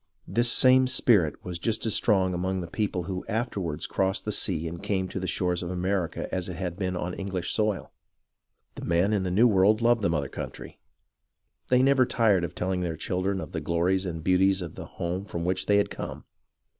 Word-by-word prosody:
This 120 Hz, 0 st, +2 dB
same 130 Hz, 0 st, +5 dB
spirit 110 Hz, -, +2 dB
was 90 Hz, -1 st, -5 dB
just 110 Hz, +5 st, -1 dB
as 110 Hz, -, +1 dB
strong 95 Hz, -4 st, +2 dB
among 95 Hz, +2 st, -1 dB
the -, -, -4 dB
people 95 Hz, -1 st, -2 dB
who 90 Hz, +1 st, -4 dB
afterwards 105 Hz, -, -2 dB
crossed 95 Hz, +1 st, -1 dB
the 105 Hz, -, -1 dB
sea 85 Hz, -5 st, 0 dB
and 85 Hz, +1 st, -7 dB
came 95 Hz, -2 st, -1 dB
to -, -, -4 dB
the 95 Hz, -, -3 dB
shores 90 Hz, 0 st, 0 dB
of 85 Hz, -, -4 dB
America 90 Hz, -1 st, -2 dB
as 95 Hz, -1 st, -2 dB
it 90 Hz, -, -5 dB
had 90 Hz, -1 st, -4 dB
been 90 Hz, -1 st, -2 dB
on 90 Hz, 0 st, -3 dB
English 95 Hz, -2 st, -3 dB
soil. 105 Hz, -3 st, -1 dB, 0.8 s
The -, -, -9 dB
men 85 Hz, +5 st, +2 dB
in 100 Hz, -, +1 dB
the 95 Hz, -, -2 dB
New 105 Hz, +7 st, +5 dB
World 105 Hz, 0 st, +4 dB
loved 120 Hz, -1 st, +3 dB
the 100 Hz, -, +1 dB
mother 75 Hz, -4 st, -1 dB
country. -, -, -8 dB, 0.9 s
They 125 Hz, 0 st, +4 dB
never 135 Hz, -2 st, +4 dB
tired 105 Hz, -6 st, +3 dB
of 85 Hz, -, -4 dB
teUing 90 Hz, 0 st, -1 dB
their 85 Hz, -3 st, -3 dB
children 95 Hz, +3 st, -1 dB
of -, -, -7 dB
the -, -, -3 dB
glories 90 Hz, +3 st, 0 dB
and 80 Hz, -2 st, -5 dB
beauties 95 Hz, +1 st, +3 dB
of 85 Hz, -, -7 dB
the -, -, -8 dB
home 90 Hz, +3 st, -4 dB
from 85 Hz, -4 st, -5 dB
which 95 Hz, +1 st, -1 dB
they 100 Hz, -, +4 dB
had 100 Hz, -, +1 dB
come. -, -, -7 dB
95 Hz, 210 wpm, -27 LUFS, 90-105 Hz, 0.9 s, same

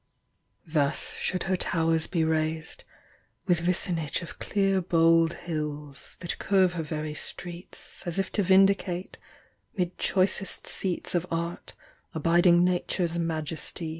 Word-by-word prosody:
Thus 150 Hz, -3 st, 0 dB
should 185 Hz, -1 st, -1 dB
her 190 Hz, -, +1 dB
towers 165 Hz, -2 st, +1 dB
be 165 Hz, -3 st, 0 dB
raised 160 Hz, 0 st, -1 dB, 0.3 s
— -, -, -37 dB
with 175 Hz, -3 st, +3 dB
vicinage 170 Hz, -2 st, 0 dB
Of 170 Hz, -, -10 dB
clear 195 Hz, -2 st, +1 dB
bold 165 Hz, -1 st, +3 dB
liills, 150 Hz, -3 st, -5 dB
that 170 Hz, -, -4 dB
curve 190 Hz, -3 st, +3 dB
her 170 Hz, -, -2 dB
very 155 Hz, -1 st, -4 dB
streets, 175 Hz, +3 st, -6 dB
As 175 Hz, -, -2 dB
if 195 Hz, -1 st, -1 dB
to 210 Hz, -, +1 dB
vindicate, 190 Hz, -1 st, +2 dB, 0.6 s
'mid 180 Hz, -1 st, -2 dB
choicest 195 Hz, 0 st, +1 dB
seats 185 Hz, -3 st, -2 dB
Of 175 Hz, 0 st, 0 dB
art, 170 Hz, +1 st, -4 dB, 0.4 s
abiding 175 Hz, +2 st, +4 dB
Nature's 175 Hz, -1 st, 0 dB
majesty. 160 Hz, 0 st, -3 dB
170 Hz, 130 wpm, -27 LUFS, 160-185 Hz, 0.6 s, abiding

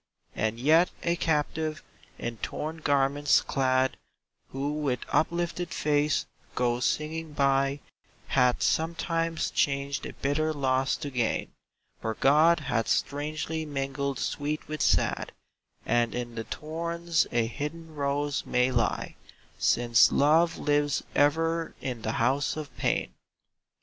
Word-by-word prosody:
[42J -, -, -5 dB
And 110 Hz, +2 st, -5 dB
yet 160 Hz, +7 st, +5 dB
a 170 Hz, 0 st, +1 dB
captive, 155 Hz, 0 st, -1 dB, 0.3 s
in 120 Hz, -1 st, -4 dB
torn 155 Hz, +8 st, -4 dB
garments 145 Hz, -1 st, +3 dB
clad, 130 Hz, 0 st, +1 dB, 0.5 s
Who 140 Hz, +2 st, -2 dB
with 145 Hz, -5 st, -1 dB
uplifted 175 Hz, +1 st, 0 dB
face 150 Hz, -2 st, +1 dB, 0.3 s
goes 120 Hz, 0 st, +1 dB
singing 155 Hz, +1 st, -2 dB
by 140 Hz, 0 st, +2 dB, 0.5 s
Hath 125 Hz, -2 st, +3 dB
sometimes 165 Hz, 0 st, 0 dB
changed 140 Hz, 0 st, 0 dB
a -, -, -8 dB
bitter 155 Hz, +3 st, 0 dB
loss 135 Hz, -2 st, +1 dB
to 145 Hz, -3 st, -5 dB
gain; 120 Hz, -3 st, -1 dB, 0.5 s
For 110 Hz, 0 st, -2 dB
God 155 Hz, +6 st, +4 dB
hath 120 Hz, -5 st, -1 dB
strangely 155 Hz, +2 st, -1 dB
mingled 140 Hz, -2 st, -3 dB
sweet 150 Hz, +4 st, -3 dB
with 155 Hz, 0 st, -4 dB
sad -, -, +1 dB, 0.5 s
And 120 Hz, -1 st, +1 dB
in 120 Hz, -1 st, -4 dB
the 115 Hz, -1 st, -5 dB
thorns 170 Hz, +2 st, -1 dB
a 120 Hz, -1 st, +2 dB
hidden 155 Hz, +6 st, -6 dB
rose 145 Hz, 0 st, -1 dB
may 125 Hz, +1 st, +1 dB
lie, 120 Hz, -4 st, -1 dB, 0.4 s
Since 120 Hz, -2 st, +4 dB
Love 160 Hz, +4 st, +3 dB
lives 145 Hz, -1 st, +1 dB
ever 165 Hz, +3 st, +1 dB
in 125 Hz, -4 st, -4 dB
the 110 Hz, +1 st, -2 dB
House 135 Hz, +6 st, +1 dB
of 155 Hz, -2 st, -7 dB
Pain. -, -, -1 dB
145 Hz, 125 wpm, -28 LUFS, 130-155 Hz, 0.5 s, yet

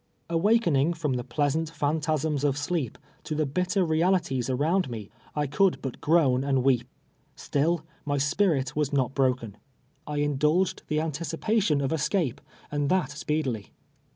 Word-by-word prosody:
Awakening 170 Hz, -5 st, +3 dB
fr 165 Hz, -2 st, -9 dB
om -, -, +1 dB
the 125 Hz, -1 st, -2 dB
pleasant 150 Hz, +5 st, -1 dB
])hantasms 150 Hz, -1 st, 0 dB
of 140 Hz, -2 st, +1 dB
sleep 145 Hz, -4 st, -2 dB, 0.3 s
to 155 Hz, -, -4 dB
the 155 Hz, 0 st, +1 dB
bitter 180 Hz, +6 st, 0 dB
realities 160 Hz, -6 st, +1 dB
around 155 Hz, +6 st, +1 dB
me, 110 Hz, -4 st, -7 dB, 0.2 s
I 150 Hz, -1 st, +1 dB
could 175 Hz, +7 st, +2 dB
but 135 Hz, -3 st, -6 dB
groan 145 Hz, -6 st, +3 dB
and 135 Hz, -2 st, +1 dB
weep. 125 Hz, -3 st, +2 dB, 0.5 s
Still 160 Hz, +3 st, 0 dB, 0.2 s
my 145 Hz, -2 st, -1 dB
spirit 145 Hz, -1 st, +1 dB
v.as 150 Hz, -1 st, 0 dB
not 135 Hz, -2 st, +1 dB
broken. 125 Hz, -6 st, 0 dB, 0.5 s
I 150 Hz, 0 st, -3 dB
indulged 150 Hz, +5 st, +1 dB
the 150 Hz, -, -1 dB
antici})ation 165 Hz, +2 st, 0 dB
of 135 Hz, -, 0 dB
escape, 160 Hz, -, 0 dB, 0.3 s
and 145 Hz, -1 st, 0 dB
that 180 Hz, -7 st, +1 dB
speedily. 150 Hz, -, -2 dB
150 Hz, 150 wpm, -27 LUFS, 135-165 Hz, 0.5 s, Awakening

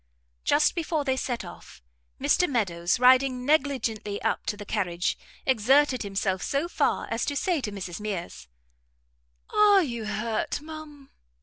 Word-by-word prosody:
Just 300 Hz, -, +3 dB
before 320 Hz, -3 st, -2 dB
they 265 Hz, -1 st, +1 dB
set 245 Hz, -5 st, -3 dB
off, 175 Hz, -, -13 dB, 0.4 s
Mr 360 Hz, -, +2 dB
Meadows, 180 Hz, -7 st, 0 dB
riding 255 Hz, 0 st, +4 dB
negligently 255 Hz, -9 st, 0 dB
up -, -, -1 dB
to 210 Hz, -, -2 dB
the 205 Hz, -, -8 dB
carriage, 180 Hz, -5 st, -1 dB, 0.3 s
exerted 265 Hz, +2 st, +3 dB
himself 195 Hz, -2 st, -1 dB
so 285 Hz, +4 st, -1 dB
far -, -, 0 dB
as -, -, -1 dB
to 285 Hz, -, -2 dB
say 345 Hz, 0 st, 0 dB
to 210 Hz, -, -4 dB
Mrs 185 Hz, -3 st, -6 dB
Mears, 175 Hz, -, -5 dB, 1.0 s
"Are 410 Hz, -2 st, +5 dB
you 235 Hz, -6 st, -4 dB
hurt, 215 Hz, +4 st, -2 dB
ma'am?" 300 Hz, -2 st, -11 dB
250 Hz, 140 wpm, -26 LUFS, 205-290 Hz, 1.0 s, Are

